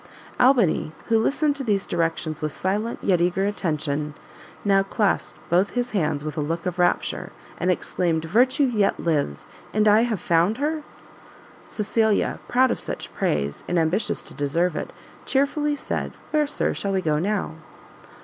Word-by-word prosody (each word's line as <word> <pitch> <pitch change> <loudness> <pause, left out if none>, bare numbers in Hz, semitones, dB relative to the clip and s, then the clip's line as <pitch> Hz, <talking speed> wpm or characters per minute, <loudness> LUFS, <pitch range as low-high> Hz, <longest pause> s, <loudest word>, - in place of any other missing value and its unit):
Albany, 240 - +3 0.2
who 225 -1 +4
listened 290 +5 +1
to 275 - -3
these 205 -5 +1
directions 165 -2 -1
with 155 -1 -1
silent, 205 +8 -2
yet 180 -3 +3
eager 180 +2 +1
attention, 150 -6 -2 0.5
now 195 -1 +4
clasped 200 +1 0
both 180 +4 +2
his 245 0 -1
hands 155 -7 0
with 155 -1 -4
a - - +1
look 165 +5 -3
of 180 -1 -3
rapture, 175 0 0 0.3
and 180 - 0
exclaimed 170 -2 0
"Virtue 250 - +3
yet 225 -7 +2
lives, 145 - -1 0.3
and 215 0 +3
I 210 +1 +6
have 230 -4 0
found 175 +6 +2
her?" 305 +3 -1 0.9
Cecilia, 215 0 +1
proud 255 +1 +3
of - - -2
such - - -6
praise, 70 -1 -1
and 175 - 0
ambitious 170 +6 0
to - - -11
deserve 155 +4 0
it, - - -4 0.4
chearfully 290 +2 +1
said, - - -4 0.2
"where, 300 -1 +2
Sir, 295 - 0
shall 200 -1 -2
we 190 - +1
go 150 -1 +1
now?" 195 -2 -1
195 Hz, 160 wpm, -24 LUFS, 165-230 Hz, 0.9 s, I